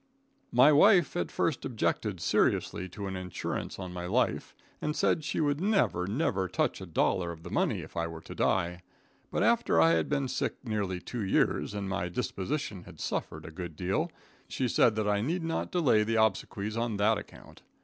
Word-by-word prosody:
My 125 +5 +7
wife 180 +5 +5
at 175 - -1
first 160 - -1
objected 105 -4 -1
seriously 95 +2 +1
to 100 +3 -6
an 95 -1 -4
insurance 90 -1 -4
on 90 -2 -6
my 90 0 -5
life, - - 0 0.3
and 150 0 -1
said 155 - +2
she - - -2
would 145 0 +1
never, 195 - +2
never 100 - 0
touch - - -1
a - - -7
dollar 90 -3 +1
of 80 -1 -10
the 85 - -8
money - - +1
if - - -12
I 85 0 -1
were 80 -1 -8
to - - -9
die, 90 -1 0 0.5
but - - 0
after - - +3
I 80 0 +6
had 80 -1 +1
been 140 -2 0
sick - - -2
nearly 105 -6 -2
two 115 +4 -5
years, 100 +1 +1
and 100 -1 -3
my 90 -2 -2
disposition 100 - -3
had - - -13
suffered - - -3
a 80 - -8
good 85 -1 -7
deal, 100 - -1 0.4
she 130 - -1
said 115 -1 +4
that 110 -1 0
I 105 0 +2
need 165 +9 -1
not 165 0 -2
delay 135 -12 +3
the 115 +2 -1
obsequies 110 -1 0
on 115 -2 -1
that 105 +2 +3
account. - - -14
105 Hz, 195 wpm, -30 LUFS, 90-135 Hz, 0.5 s, My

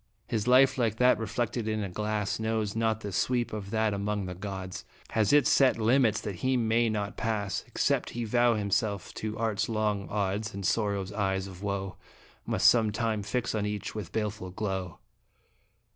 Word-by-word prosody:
His 110 0 -2
life, 130 +1 +5
like 115 -3 +1
that 125 -1 +4
reflected 115 +1 -2
in 110 -1 -1
a 100 - -3
glass, 105 +1 -2
Knows 110 -2 -1
not 110 -1 0
the 100 - -5
sweep 120 +6 0
of 100 -2 -5
that 110 0 +1
among 100 0 -2
the 90 - -5
gods 95 0 -6 0.3
Has 110 -3 +2
its 145 -1 +5
set 135 -3 +4
limits 115 0 +3
that 100 -4 -5
he 130 +6 +1
may 115 0 +2
not 105 -1 -3
pass 105 -3 -1
Except - - 0
he 120 - -4
vow 120 +1 +3
himself 100 -1 -1
to 110 0 -4
Art's 105 -2 -1
long 105 -3 -1
odds, 105 +1 -2
And 100 -1 -4
Sorrow's 100 -3 0
eyes 95 -2 0
of 95 -1 -10
woe 100 -1 -3 0.5
Must - - +3
some 110 -3 +5
time 110 0 -1
fix 115 +4 -2
on 105 -1 -1
each 105 -1 -4
with 105 -6 -6
baleful 105 -4 -3
glow. 95 -3 -3
105 Hz, 180 wpm, -29 LUFS, 100-115 Hz, 0.5 s, life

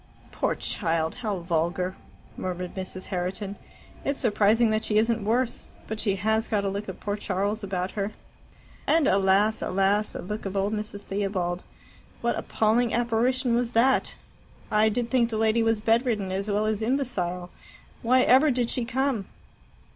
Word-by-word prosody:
"Poor - - 0
child, 165 -1 -1
how 210 -4 -1
vulgar!" 175 +2 -1 0.4
murmured 180 -1 -4
Mrs. 185 0 -5
Herriton. 190 +2 -3 0.5
"It's 280 0 -1
surprising 220 0 +3
that 215 0 0
she 210 - +1
isn't 225 0 +2
worse. 235 +3 0 0.2
But 220 0 -5
she 200 -4 +1
has 220 +3 +1
got 205 -3 0
a - - +1
look 200 +2 -4
of 190 - -7
poor 205 0 -2
Charles 205 +2 -2
about 185 -1 -2
her." 205 0 -2 0.8
"And 325 -2 +4
alas, 195 +3 +3
alas! 195 +3 +1
a - - -5
look 210 +2 -4
of 195 +1 -4
old 200 +2 +1
Mrs. 210 -1 -4
Theobald. 190 -3 -2 0.6
What - - +1
appalling 225 +2 +1
apparition 240 +2 +1
was 240 0 0
that! 255 +4 +3 0.6
I 215 +1 +4
did 230 +1 -2
think 240 -3 +3
the 220 - -2
lady 220 +1 +3
was 225 -1 +2
bedridden 225 -3 +1
as 195 +2 -2
well 210 +1 +1
as 215 0 0
imbecile. 195 -8 -1 0.5
Why 255 +2 +4
ever 270 +5 +6
did 245 -3 0
she 245 - -1
come?" 260 -4 -1
215 Hz, 160 wpm, -26 LUFS, 195-230 Hz, 0.8 s, ever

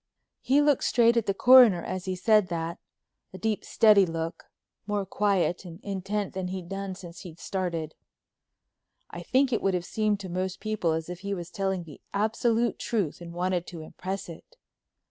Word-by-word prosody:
He 280 +3 +3
looked 290 -3 +3
straight 235 -1 +4
at 230 -2 +1
the 195 - +2
Coroner 240 -8 +7
as 185 -1 -4
he 185 -1 -2
said 210 +1 +3
that, 170 -1 -4 0.5
a - - -7
deep 220 +1 -1
steady 210 -3 +5
look, 165 0 -5 0.4
more 205 -1 -1
quiet 195 -3 0
and 170 -1 -10
intent 200 +1 -3
than 190 -1 -3
he'd 185 -1 -5
done 195 -1 -4
since 175 -3 -11
he 175 -4 -10
started. 170 -3 -3 1.2
I - - -7
think 265 -1 +2
it 230 - +1
would 195 -1 +1
have 175 -1 -2
seemed 215 0 0
to 190 - -6
most 185 +1 -3
people 215 -7 -1
as 160 0 -3
if 180 0 -7
he 200 +1 -3
was 175 -1 -7
telling 190 -2 -2
the 155 -4 -13
absolute 225 +3 +1
truth 195 -9 -2
and 170 -1 -8
wanted 180 0 -1
to 170 -3 -8
impress 190 +5 -6
it. 170 - -12
190 Hz, 185 wpm, -27 LUFS, 175-210 Hz, 1.2 s, Coroner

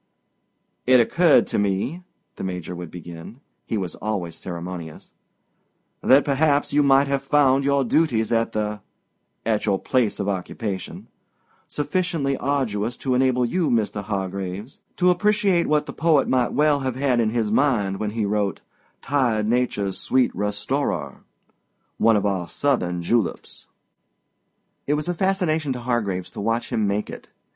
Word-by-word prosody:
"It 130 0 +7
occurred 165 +9 +4
to - - -1
me," 100 - -1 0.3
the - - -7
Major 90 -2 -4
would 85 -1 -7
begin—he 85 - -8
was 95 -4 -3
always 95 -6 -4
ceremonious—"that 90 - -3
perhaps 145 +1 +1
you 150 - +4
might 140 0 +5
have 140 -1 -1
found 140 -1 +3
your 140 0 +2
duties 120 -6 +1
at 115 0 +1
the—at 105 +1 -5
your 100 -2 +2
place 120 0 0
of 100 - -2
occupation—sufficiently 135 - -4
arduous 125 -5 -1
to 130 - -1
enable 125 -1 +2
you, 170 +7 0
Mr. 105 -3 0
Hargraves, 100 - -4 0.2
to 180 0 +4
appreciate 200 -1 +2
what 150 -1 +2
the - - -7
poet 155 -3 +2
might 125 -2 +1
well 150 -1 +3
have 130 -2 -2
had 130 -2 +1
in 115 -2 +2
his 110 -2 -1
mind 110 -7 +1
when 105 - -1
he 110 0 -2
wrote, 100 -1 -1 0.4
'tired 120 -7 +1
Nature's 110 -5 0
sweet 130 -1 +1
restorer'—one 105 +2 -3
of 105 -1 +1
our 95 -4 -1
Southern 90 -12 -1
juleps." 110 +1 -2 1.2
It 145 - +2
was 150 +2 -3
a 175 - 0
fascination 170 -5 0
to 125 - -6
Hargraves 105 -7 -2
to - - -7
watch 115 +3 -1
him 110 -2 +1
make 100 +1 -2
it. - - -10
120 Hz, 140 wpm, -23 LUFS, 100-140 Hz, 1.2 s, It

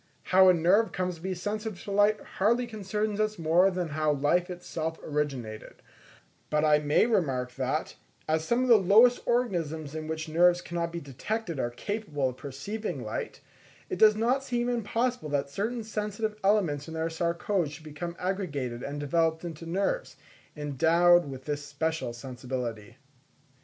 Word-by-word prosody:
How 190 0 +6
a - - +7
nerve 185 +7 +3
comes 180 -2 -2
to - - -16
be 190 +1 -3
sensitive 210 +1 -4
to 200 - -6
light, 205 +1 +4 0.2
hardly 235 +5 +3
concerns 210 -1 -3
us 215 0 0
more 170 +3 +4
than 180 -3 -3
how 155 0 +1
life 160 +6 +1
itself 165 -2 -4
originated; 135 -8 -3 0.7
but 150 0 +2
I 150 -1 +5
may 150 +5 +3
remark 135 - 0
that, 135 +4 -2 0.3
as 155 0 +1
some 235 +8 +1
of - - 0
the 235 -2 +8
lowest 220 +6 +6
organisms 165 - -1
in 155 0 -5
which 160 0 -4
nerves 175 +2 +4
cannot 170 -1 -3
be 170 - -4
detected, 165 - -4
are 120 - 0
capable 145 - -2
of 125 - -9
perceiving 150 - -5
light, 485 - -5 0.5
it 370 - -2
does 215 -1 +7
not 245 +5 +1
seem 240 -2 -1
impossible 240 -3 -1
that 140 -1 -1
certain 225 +8 -2
sensitive 210 0 -3
elements 180 -8 +2
in 160 - -7
their 160 +1 -1
sarcode 170 +1 -1
should 155 +2 -11
become 165 +3 -6
aggregated 150 -11 -3
and 145 +2 -5
developed 160 +3 +1
into 165 -1 -7
nerves, 200 - -1 0.4
endowed 165 +3 +4
with 130 -1 -8
this 145 -1 -3
special 160 -1 -2
sensibility. 120 -2 -6
170 Hz, 160 wpm, -28 LUFS, 150-210 Hz, 0.7 s, the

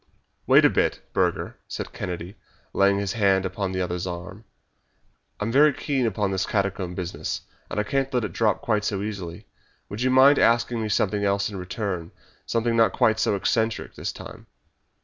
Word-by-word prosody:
"Wait - - +6
a - - +7
bit, - - +1
Burger," - - -1
said - - -6
Kennedy, 90 +2 -5 0.4
laying 100 0 +3
his 100 -1 -2
hand 95 -3 +2
upon 95 0 -3
the 95 0 -2
other's 90 0 -3
arm; 90 +4 -7 0.9
"I - - -2
am 115 - -1
very 150 +4 +6
keen 135 -4 -1
upon 105 -2 -1
this 95 0 -1
catacomb 95 -3 -1
business, 90 -1 -4 0.3
and - - -2
I - - +2
can't 135 +4 -1
let 125 -2 0
it 100 -5 -4
drop 110 +4 +1
quite 105 -5 +1
so 100 -2 -1
easily. 95 -5 -6 0.4
Would 105 +3 -6
you 130 - +2
mind 135 +2 +6
asking 115 0 +2
me 110 - -2
something 105 0 +1
else 100 +1 +1
in - - -7
return 90 -2 -4 0.4
something 115 0 0
not 115 -1 +4
quite 110 0 +2
so 105 - +2
eccentric 110 +3 -1
this - - -4
time?" - - -11
100 Hz, 185 wpm, -25 LUFS, 95-115 Hz, 0.9 s, a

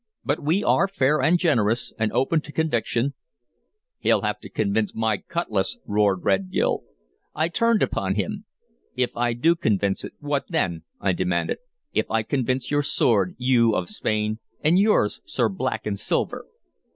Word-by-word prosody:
But 145 +2 0
we 165 +8 +1
are 195 - +3
fair 150 -6 +1
and 165 +6 +4
generous 120 - +1
and 110 -1 +1
open 150 +5 +1
to 150 - -11
conviction" 140 -4 0 0.9
"He'll - - +3
have - - -1
to - - -11
convince 105 0 0
my 110 -2 +1
cutlass!" 110 - -2
roared 100 -3 +1
Red 95 -1 +2
Gil. - - +1 0.5
I 160 +2 +1
turned 230 +5 +2
upon 95 0 -1
him. 100 -4 -3 0.5
"If 125 -1 -1
I 120 0 +1
do 165 +9 +3
convince 100 - 0
it, - - -7
what 145 -1 -1
then?" 90 - -1
I 100 - +1
demanded. 90 -1 -1 0.3
"If - - 0
I 110 0 +1
convince 130 +1 -1
your 145 0 +3
sword, 105 -9 +2
you 120 -3 +3
of 90 - -2
Spain, 110 +1 -1 0.2
and 165 +5 +4
yours, 205 - +2
Sir 120 -4 0
Black 125 +7 -3
and 100 -2 -2
Silver?" - - -1
120 Hz, 165 wpm, -24 LUFS, 105-150 Hz, 0.9 s, and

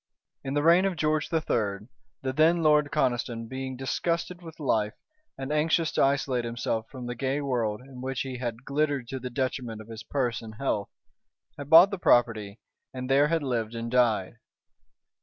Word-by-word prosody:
In 135 +1 -3
the 145 - +1
reign 170 +4 +6
of 195 -2 0
George 155 -1 0
III., 110 -10 -1 0.4
the 130 0 -1
then 165 +2 +4
Lord 150 -1 +4
Conniston 120 -2 -1
being 130 +1 -5
disgusted 170 +6 -2
with 165 -1 -11
life, 110 -6 0 0.4
and 135 +1 -5
anxious 160 +1 +2
to - - 0
isolate 135 -3 +1
himself 115 -1 -3
from 130 -3 -8
the 120 - -3
gay 135 +3 -1
world, 120 -6 -1
in 130 -1 -11
which 130 0 -3
he 130 -2 -5
had 120 0 -5
glittered 140 -3 0
to 135 0 -4
the 125 0 -5
detriment 125 -3 -3
of 110 +1 -11
his 115 0 -7
purse 125 -4 -2
and 110 -1 -10
health, 105 -4 -2 0.7
had 145 0 -8
bought 170 +5 +9
the 200 - -4
property 115 - +2 0.3
and 130 0 -5
there 140 +2 +5
had 165 -1 0
lived 120 -4 -2
and 115 0 -4
died. 115 -5 +2
130 Hz, 180 wpm, -27 LUFS, 115-150 Hz, 0.7 s, bought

